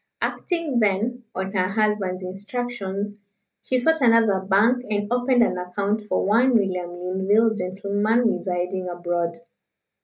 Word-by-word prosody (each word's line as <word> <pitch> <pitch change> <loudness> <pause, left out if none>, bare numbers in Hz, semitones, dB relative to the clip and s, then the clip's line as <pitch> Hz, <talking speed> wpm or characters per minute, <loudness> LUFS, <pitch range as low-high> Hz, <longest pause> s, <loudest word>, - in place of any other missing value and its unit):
Acting, 330 -8 -1
then, 225 +4 0
on 190 +1 -3
her 185 -2 +1
husband's 200 -3 0
instructions, 205 +1 -4 0.5
she 255 - 0
sought 320 +5 +2
another 230 -5 +4
bank 205 +6 +2
and 205 +2 -1
opened 245 0 +3
an 180 - 0
account 200 +4 -2
for 210 - -1
one 235 +5 +3
William 185 -5 0
Linville, 190 +5 +1
gentleman, 205 +4 0
residing 180 -2 -2
abroad. 175 -1 -2
205 Hz, 125 wpm, -23 LUFS, 185-230 Hz, 0.5 s, another